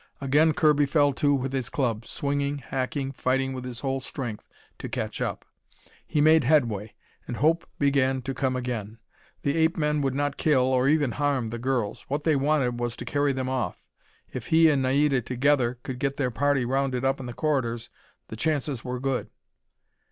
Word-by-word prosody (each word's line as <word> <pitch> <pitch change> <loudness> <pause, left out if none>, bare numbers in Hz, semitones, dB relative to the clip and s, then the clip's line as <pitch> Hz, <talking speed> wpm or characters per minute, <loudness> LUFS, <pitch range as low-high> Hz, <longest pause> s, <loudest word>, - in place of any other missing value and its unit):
Again 150 +4 +3
Kirby 150 -1 +3
fell 145 -1 +3
to 145 +1 +2
with 135 0 -3
his 130 -3 -2
club, 115 -5 -1
swinging, 140 0 -1
hacking, 135 +1 -3
fighting 135 0 0
with 130 -1 -6
his 125 -2 -6
whole 135 -1 -1
strength 125 -5 -6 0.3
to - - -6
catch - - -4
up. - - -3 0.6
He 150 - 0
made 155 +1 +6
headway, 115 -7 +1 0.3
and 120 - -4
hope 165 +4 +2
began 135 -2 +2
to 135 +1 -3
come 130 -1 -1
again. 115 -4 -4 0.5
The 140 +1 +1
ape 160 +2 +2
men 150 -1 +1
would 135 -2 0
not 145 0 -1
kill, 145 -5 +3
or 130 0 +2
even 145 -3 +3
harm, 140 -5 0
the 120 - -4
girls. 125 -4 -1
What 145 +2 -2
they 160 -2 +3
wanted 135 -4 +1
was 120 -1 -2
to - - -7
carry 145 0 +1
them 130 -1 -2
off. 130 -1 -3 0.5
If - - -5
he 160 0 +5
and 140 -3 +2
Naida 135 +1 +2
together 125 0 +1
could 125 -1 -5
get 140 0 -1
their 130 -3 0
party 140 +1 +1
rounded 130 0 0
up 135 +1 +1
in 130 - -6
the - - -5
corridors, 120 -5 -1 0.4
the - - -6
chances 145 -1 -1
were 125 0 -4
good. 135 -1 -2
135 Hz, 190 wpm, -26 LUFS, 125-145 Hz, 0.6 s, made